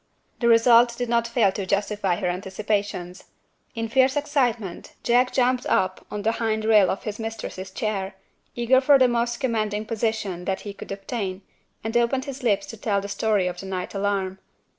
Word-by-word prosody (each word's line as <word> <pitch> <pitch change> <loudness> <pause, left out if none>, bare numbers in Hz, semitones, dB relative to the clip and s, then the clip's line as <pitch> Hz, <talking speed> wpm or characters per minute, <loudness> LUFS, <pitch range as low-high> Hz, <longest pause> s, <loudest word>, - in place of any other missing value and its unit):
The 235 - +1
result 235 +1 +5
did 245 -1 -3
not 235 0 +2
fail 230 -4 +3
to 195 - -4
justify 200 -1 0
her - - -4
anticipations. 190 0 -3 0.5
In 225 0 -2
fierce 260 +3 +3
excitement, 245 - -1
Jack 245 +1 +3
jumped 255 -1 +1
up 185 0 0
on 205 -1 -5
the 225 - +2
hind 220 -1 -1
rail 215 -3 +5
of 195 - -3
his 215 0 -5
mistress's 220 -4 -5
chair, 195 -1 -3 0.4
eager 245 +2 +3
for 280 +1 +6
the 260 -1 +5
most 240 0 0
commanding 215 -4 -1
position 215 -5 -2
that 190 0 -2
he 205 - -7
could - - -10
obtain, 195 -1 -4 0.4
and 225 +2 -4
opened 240 +3 +2
his 275 -1 -7
lips 215 -5 +1
to - - -9
tell 205 -1 0
the 200 - -6
story 200 -1 +1
of 180 -1 -3
the 195 - -7
night 185 -1 -4
alarm. 195 -1 -1
215 Hz, 185 wpm, -24 LUFS, 195-235 Hz, 0.5 s, for